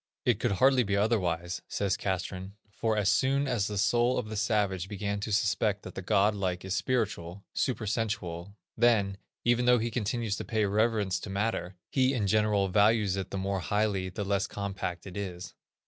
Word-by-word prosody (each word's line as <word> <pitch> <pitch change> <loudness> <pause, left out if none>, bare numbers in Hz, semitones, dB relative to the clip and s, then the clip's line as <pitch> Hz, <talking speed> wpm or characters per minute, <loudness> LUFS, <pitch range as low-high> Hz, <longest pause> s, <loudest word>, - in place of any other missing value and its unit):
"It - - +3
could - - +1
hardly 130 +6 +4
be 100 -3 0
otherwise," 90 -5 0
says 100 -2 0
Castrén, 95 0 -3 0.2
"for 110 +1 -1
as 105 -2 +1
soon 140 +6 +2
as 115 -6 0
the 105 - -4
soul 120 +5 +2
of 110 - -3
the 110 - -5
savage 100 -4 0
began 100 0 -3
to 105 +2 -4
suspect 105 0 +1
that - - -8
the - - -5
godlike 100 -2 +1
is 95 +1 -1
spiritual, 100 -7 -2
super 120 -4 -1
sensual, 100 -4 -3 0.2
then, 110 -5 +3 0.3
even 120 +1 +3
though 125 0 +6
he 115 +1 -1
continues 110 -1 -1
to - - -4
pay 110 -3 0
reverence 105 -1 +1
to - - -7
matter, 100 -2 -2 0.2
he 130 0 +2
in 110 -5 0
general 105 -1 +2
values 105 0 +3
it 95 -2 -4
the - - -4
more 95 0 -1
highly 100 -1 0
the 95 +3 -4
less 100 0 0
compact 95 -3 -4
it 95 - -9
is. 95 -3 -5
100 Hz, 185 wpm, -29 LUFS, 95-110 Hz, 0.3 s, though